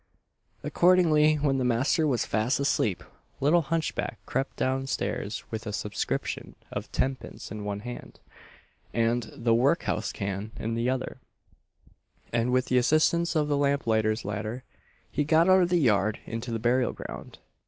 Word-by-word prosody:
Accordingly, 160 -4 +4
when 140 -2 +1
the - - 0
master 130 +6 +2
was 125 -6 +1
fast 110 +6 0
asleep, 115 -9 0 0.4
little 155 +5 +4
hunchback 160 +1 -2
crept 135 +1 -2
down 135 +1 0
stairs 105 -3 -3
with 110 0 -5
a - - -2
subscription 105 0 -3 0.2
of - - -5
tenpence 130 -6 -3
in 105 0 -5
one 100 0 -3
hand, 120 +2 -8 0.8
and 115 0 +1
"the 115 -4 +1
workhouse 120 -4 +1
can" 100 +2 -4
in 115 +1 -3
the 115 +2 0
other; 130 0 -3 1.1
and 120 +1 +1
with 130 0 +2
the 125 - +3
assistance 160 +5 +2
of 150 -1 +2
the 145 - +1
lamplighter's 115 -6 +1
ladder 110 +4 -4 0.5
he 150 - 0
got 160 +3 +4
out 185 0 +6
of 175 - +2
the 175 - +3
yard 105 -7 +2
into 115 +1 -5
the 115 - -1
burial 120 +3 +1
ground. - - -9
125 Hz, 155 wpm, -27 LUFS, 110-150 Hz, 1.1 s, out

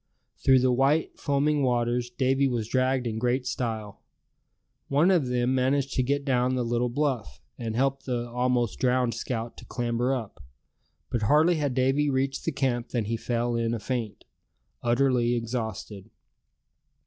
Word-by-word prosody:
Through 135 -1 +6
the 130 0 +3
white 135 +5 +1
foaming 145 +1 +1
waters 120 -1 0
Davy 135 +2 +1
was 120 -4 -2
dragged 130 +1 +1
in 110 -1 -2
great 125 +2 0
style. 110 -5 -4 0.9
One 150 +7 +3
of 165 -8 +2
them 125 +1 +1
managed 135 +1 +1
to 130 - +1
get 140 +2 -1
down 130 -1 +1
the 125 - 0
little 120 +1 0
bluff, 120 - -2 0.2
and 115 -2 -3
helped 135 +2 0
the 120 -2 -2
almost 125 -1 0
drowned 125 -2 +2
scout 115 -2 -4
to - - -11
clamber 120 +1 -1
up. 120 -6 -4 0.7
But 120 -3 0
hardly 155 +10 +4
had 145 -4 -1
Davy 135 +3 +2
reached 135 0 -1
the 165 - +1
camp 130 -4 -1
than 120 -4 -1
he 115 +3 -1
fell 120 +1 -1
in 115 0 0
a - - -4
faint, 115 -2 -4 0.6
utterly 120 0 +2
exhausted. 110 -3 -4
125 Hz, 160 wpm, -27 LUFS, 120-135 Hz, 0.9 s, Through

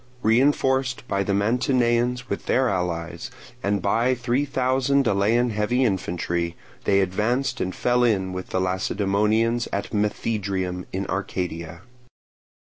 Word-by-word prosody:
Reinforced 130 +2 +2
by 100 - 0
the 100 0 0
Mantineans 120 +2 +1
with - - -4
their 130 0 +3
allies, 85 -2 -3 0.3
and 100 -3 0
by 120 +5 +2
three 125 +3 0
thousand 135 +1 +1
Elean 115 +4 +2
heavy 105 +5 +1
infantry, 85 -4 -1 0.3
they 100 0 +4
advanced 120 +8 0
and 95 0 -2
fell 125 0 +2
in 95 -6 +1
with 95 0 -6
the 95 - 0
Lacedaemonians 105 +5 +1
at 100 - -3
Methydrium 100 -4 -1
in 95 +1 -3
Arcadia. 90 -3 -4
105 Hz, 125 wpm, -24 LUFS, 95-125 Hz, 0.3 s, they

